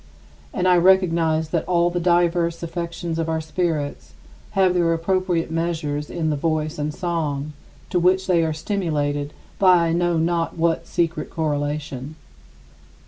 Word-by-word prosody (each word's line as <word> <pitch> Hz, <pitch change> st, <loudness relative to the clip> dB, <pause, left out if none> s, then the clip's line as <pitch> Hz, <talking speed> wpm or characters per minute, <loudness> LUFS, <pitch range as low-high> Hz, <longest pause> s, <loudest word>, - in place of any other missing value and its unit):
And 185 Hz, -2 st, 0 dB
I 180 Hz, -1 st, +5 dB
recognize 170 Hz, -3 st, +3 dB
that 165 Hz, -1 st, 0 dB
all 175 Hz, -1 st, +2 dB
the 175 Hz, -, -1 dB
diverse 170 Hz, -1 st, +1 dB
affections 170 Hz, 0 st, -4 dB
of 165 Hz, 0 st, -1 dB
our 160 Hz, 0 st, 0 dB
spirits 155 Hz, -, -3 dB, 0.4 s
have 190 Hz, -2 st, +4 dB
their 170 Hz, -2 st, +2 dB
appropriate 175 Hz, 0 st, 0 dB
measures 155 Hz, -3 st, -2 dB
in 160 Hz, -3 st, -1 dB
the -, -, 0 dB
voice 155 Hz, 0 st, -1 dB
and 150 Hz, +1 st, -1 dB
song, 150 Hz, -3 st, -3 dB, 0.4 s
to 180 Hz, -, +2 dB
which 185 Hz, +2 st, +3 dB
they 175 Hz, -3 st, +3 dB
are 160 Hz, -, 0 dB
stimulated 150 Hz, -4 st, -2 dB, 0.3 s
by 180 Hz, -3 st, +5 dB
I -, -, +1 dB
know 175 Hz, 0 st, +1 dB
not 165 Hz, +1 st, 0 dB
what 165 Hz, 0 st, 0 dB
secret 165 Hz, -2 st, -1 dB
correlation. 145 Hz, -2 st, -3 dB
165 Hz, 145 wpm, -22 LUFS, 155-175 Hz, 0.4 s, I